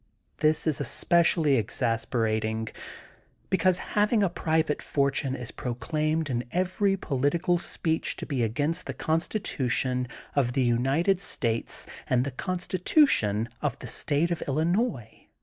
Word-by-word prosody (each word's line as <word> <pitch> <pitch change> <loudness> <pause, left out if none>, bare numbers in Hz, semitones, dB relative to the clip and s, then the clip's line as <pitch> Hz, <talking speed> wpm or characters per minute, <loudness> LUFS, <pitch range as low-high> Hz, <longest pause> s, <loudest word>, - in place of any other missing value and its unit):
This 155 +1 +2
is 155 -3 0
especially 160 +1 +3
exasperating 110 -1 -1 0.8
because 185 -1 +3 0.2
having 210 +1 +3
a 195 - +2
private 160 -2 0
fortune 140 -1 0
is 125 -2 -6
proclaimed 155 +6 -2
in 120 -3 -2
every 185 +2 +1
political 165 +4 0
speech 160 -1 -1
to - - -6
be 135 -5 -2
against 145 +10 -1
the - - -5
Con 160 0 +1
stitution 125 - -1 0.3
of 125 -4 +1
the 135 - +1
United 135 +11 +2
States 115 -10 0 0.2
and 125 0 +3
the 140 - -3
Consti 185 +6 -3
tution 115 - +3 0.2
of 150 - -1
the - - -9
State 155 +4 0
of 170 - -2
Illinois. 160 - -1
145 Hz, 130 wpm, -27 LUFS, 125-170 Hz, 0.8 s, especially